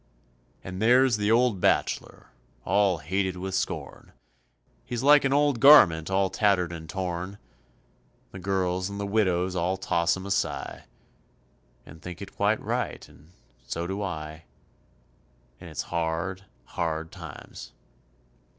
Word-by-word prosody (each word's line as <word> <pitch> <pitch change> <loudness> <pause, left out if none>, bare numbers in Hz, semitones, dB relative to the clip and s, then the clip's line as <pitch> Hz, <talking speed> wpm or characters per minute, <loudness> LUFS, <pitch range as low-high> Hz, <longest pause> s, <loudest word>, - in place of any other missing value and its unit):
And 95 +1 -7
there's 125 +1 +4
the 105 0 0
old 115 -4 +3
bachelor, - - -1 0.3
all 100 -3 +2
hated 95 +4 -2
with 95 +1 -5
scorn, 95 - -4 0.7
He's 120 0 -4
like 145 +1 +6
an 135 - +1
old 145 -3 +2
garment 90 - +7
all 95 0 +1
tattered 95 -4 +2
and 80 -2 -8
torn, 90 +2 -4 0.9
The 95 - -9
girls 95 0 -1
and 100 0 -6
the 100 - -2
widows 95 -3 +1
all 90 +2 0
toss 85 -2 +1
him 95 - -8
a 100 - -5
sigh, - - -2 1.0
And 80 - -14
think 90 -1 -8
it - - -10
quite - - +1
right, - - -3
and 75 +3 -20 0.4
so 85 +7 -3
do 95 +3 -4
I, 80 -4 -6 1.1
And - - -10
it's - - -4
hard, 85 +3 -2 0.2
hard 80 +1 -3
times. - - -10
95 Hz, 135 wpm, -26 LUFS, 85-100 Hz, 1.1 s, garment